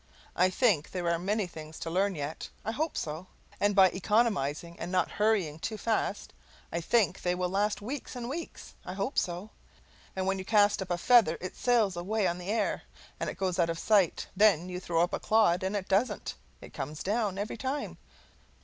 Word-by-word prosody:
I 185 +1 +4
think 185 - +2
there 180 -2 -3
are 170 - 0
many 205 +3 0
things 155 -3 -10
to 165 - -4
learn 195 +2 +1
yet 150 +1 -5 0.2
I 220 - 0
hope 310 +7 -2
so; 160 +4 -4 0.3
and 205 0 +2
by 190 -2 +7
economizing 175 - 0
and 175 - -4
not 185 - +1
hurrying 205 -8 +1
too 220 +5 -3
fast 225 0 -1 0.4
I 170 - -2
think 195 0 +2
they 180 0 0
will 180 0 -1
last 205 +2 0
weeks 255 +4 -5
and 240 -1 -5
weeks. 325 +6 -6
I 180 - -6
hope 200 +8 -2
so. 180 +4 -4 0.6
When 190 0 0
you - - -4
cast 205 0 +3
up 190 - -5
a 175 - 0
feather 215 -5 +5
it 185 - -6
sails 230 -6 +2
away 200 +4 -1
on 175 0 0
the 180 +2 -6
air 215 -1 0 0.4
and - - -3
goes 185 -1 -1
out 170 -1 +3
of 165 - -2
sight; 200 -2 +2
then 185 -4 +4
you 180 0 -4
throw 170 -2 +1
up 175 - -2
a - - 0
clod 210 -5 +3
and 190 +2 -1
it 195 -2 -3
doesn't. 205 +2 0 0.3
It - - -12
comes 150 +3 -5
down, 205 -1 0
every 205 +2 -3
time. 270 +4 -3
190 Hz, 200 wpm, -30 LUFS, 175-215 Hz, 0.6 s, by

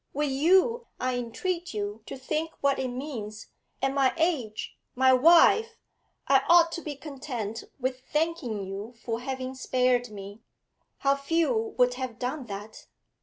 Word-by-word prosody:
Will 295 +1 0
you 380 - +3
I 255 0 0
entreat 290 +7 -3
you 205 +1 -3
to - - -6
think 310 +5 -2
what 280 -1 +2
it 260 - -1
means 245 -5 -6 0.3
at 270 0 +2
my 270 -2 +2
age 290 -11 -1 0.2
my 260 +1 +5
wife 345 - +5 0.5
I 270 -1 +5
ought 340 -1 +7
to 340 - -4
be 300 -3 -5
content 260 -7 -6
with 255 0 -2
thanking 300 - -1
you 200 +5 -7
for 230 -1 -2
having 260 +1 -4
spared 250 -2 +1
me 205 +1 -9 0.6
how 275 0 +2
few 335 - 0
would 250 -1 +4
have 250 -3 -4
done 255 +2 -4
that! 205 +1 -8
260 Hz, 150 wpm, -27 LUFS, 235-315 Hz, 0.6 s, ought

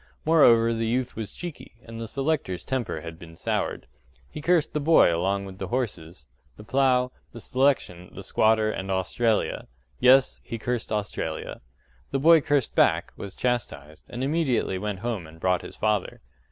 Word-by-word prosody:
Moreover 115 -8 +5
the 115 0 -1
youth 125 +2 -1
was 110 -3 -5
cheeky, 175 -8 -9
and 115 0 -8
the 115 - -5
selector's 135 - -2
temper 125 - -3
had 80 0 -9
been 80 -1 -12
soured: - - -2 0.5
he 150 - -7
cursed 170 0 +2
the 150 - 0
boy 150 - +5
along 100 +3 -1
with 95 0 -10
the 95 - -4
horses, 90 -9 -4 0.3
the 105 - -11
plough, 125 +1 +2 0.2
the 120 - -8
selection, 125 -9 0
the - - -9
squatter, 110 0 +2
and 95 -2 -5
Australia. 95 +4 0 0.3
Yes, 130 +1 +4
he 115 - -6
cursed 120 0 -3
Australia. 105 -2 -4 0.5
The 140 - -1
boy 160 +2 +6
cursed 140 -4 0
back, - - +2
was 100 -1 -8
chastised, 90 - -3
and 120 +2 -5
immediately 135 - 0
went 105 -2 -4
home 110 -8 -3
and 80 +1 -15
brought 90 0 +1
his - - -10
father. 105 -3 -1
115 Hz, 165 wpm, -25 LUFS, 95-130 Hz, 0.5 s, boy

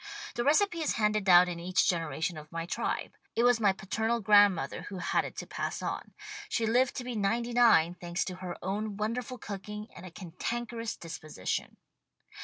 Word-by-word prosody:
The 240 - -1
recipe 335 +5 +3
is 310 - +1
handed 210 -2 +1
down 180 -1 +8
in 175 -1 -4
each 180 +2 +1
generation 165 -1 -1
of 155 0 -10
my 165 0 -3
tribe. 175 - -2 0.2
It 235 - +2
was 245 -1 +5
my 205 -3 +4
paternal 220 +5 -1
grandmother 205 -4 +4
who 195 - -6
had 180 - 0
it - - -8
to - - -4
pass - - -3
on. - - -4 0.3
She 230 - 0
lived 245 +3 +2
to 250 - -4
be 245 -1 -5
ninety 230 +4 0
nine, 225 -9 +5
thanks 175 0 -3
to 185 -1 -5
her 185 -2 -6
own 205 +2 -2
wonderful 240 +4 -3
cooking 210 +1 -7
and - - -10
a 185 - -8
cantankerous 230 +7 -4
dis 165 -1 -7
position. 150 -12 -4
205 Hz, 190 wpm, -30 LUFS, 180-235 Hz, 0.3 s, down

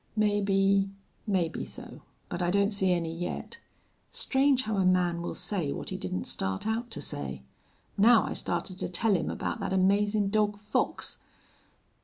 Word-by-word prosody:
"Maybe 200 -2 +2 0.4
maybe 180 -5 0
so. - - -4 0.3
But 175 - -4
I 175 - +1
don't 200 +3 +2
see 190 -2 +2
any 165 -2 -1
yet.... 175 +1 -5 0.5
Strange 265 -1 +2
how 215 -3 -2
a 190 - +3
man 180 -2 +2
will 170 - -4
say 175 -9 -1
what - - -5
he - - -3
didn't 90 -1 -3
start 95 - -2
out 225 +2 -1
to - - -5
say. 65 -2 -4 0.6
Now, 225 +2 +7
I - - -3
started 185 -1 -2
to - - -3
tell 200 +4 +2
him 170 - -1
about - - -3
that - - -2
amazin' 200 +2 +2
dog 210 -1 +2
Fox." 210 +1 -1
195 Hz, 165 wpm, -29 LUFS, 175-210 Hz, 0.6 s, Now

